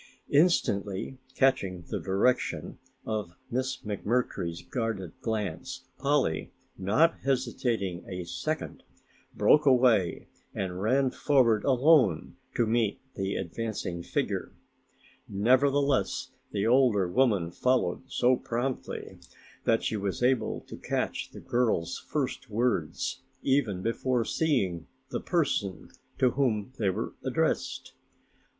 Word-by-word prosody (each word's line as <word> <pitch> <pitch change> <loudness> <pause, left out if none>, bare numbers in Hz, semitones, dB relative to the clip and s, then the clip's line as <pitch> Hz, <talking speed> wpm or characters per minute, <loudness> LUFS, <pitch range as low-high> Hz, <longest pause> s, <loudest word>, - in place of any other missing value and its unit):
Instantly 130 - +2 0.2
catching 100 -10 +2
the - - -4
direction 95 -4 0 0.3
of 105 -5 -3 0.2
Miss 130 +2 -2
McMurtry's 100 -5 -2
guarded 100 -3 -3
glance, 110 +4 -3
Polly, 140 - +1 0.2
not 110 - +2
hesitating 120 -8 -1
a 90 -1 -4
second, 155 - -4 0.5
broke 150 -1 +5
away 120 -9 +4 0.3
and 95 -1 -3
ran 130 +5 +2
forward 120 -8 +3
alone 130 - +4 0.2
to 120 - +3
meet 110 -2 +1
the 95 0 -2
advancing 95 -2 -3
figure. - - -2 0.8
Nevertheless, 130 +4 +2 0.2
the 100 0 -1
older 115 -6 +4
woman 100 -5 +2
followed 125 +7 +1
so 125 0 +4
promptly 130 +1 -4 0.5
that 115 - +3
she 110 - -1
was 100 +3 -2
able 125 -2 +1
to - - -10
catch - - -2
the - - -11
girl's 110 -9 0
first 130 -3 -3
words 105 -8 -1 0.2
even 120 -9 +1
before 120 +1 0
seeing 100 - 0 0.2
the - - -2
person 140 - -1 0.3
to 130 -2 +4
whom 125 -3 0
they 100 -4 +2
were 95 - -3
addressed. - - -1
115 Hz, 110 wpm, -29 LUFS, 95-130 Hz, 0.8 s, broke